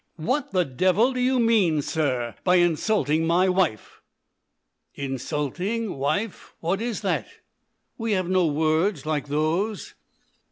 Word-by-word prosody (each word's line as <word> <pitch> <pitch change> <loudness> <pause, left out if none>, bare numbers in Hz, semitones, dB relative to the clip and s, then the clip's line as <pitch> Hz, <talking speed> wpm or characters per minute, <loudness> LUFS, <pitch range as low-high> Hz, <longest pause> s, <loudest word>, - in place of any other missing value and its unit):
"What 255 - -1
the 185 -2 +1
devil 185 - +2
do 255 - -3
you 255 +1 +2
mean, 200 -10 +3
sir, 130 -8 -1
by 180 -1 +4
insulting 165 -2 +2
my 175 +3 +3
wife 180 - -1 0.5
?" - - -54 0.2
"Insulting. 150 - -3
Wife. 155 +10 -3
What 180 +5 -1
is 235 -2 -3
that? - - -1 0.7
We 225 -1 0
have 185 -3 0
no 185 -2 +2
words 155 +2 +1
like 155 -2 -2
those." 160 +9 -1
175 Hz, 130 wpm, -24 LUFS, 150-210 Hz, 0.7 s, by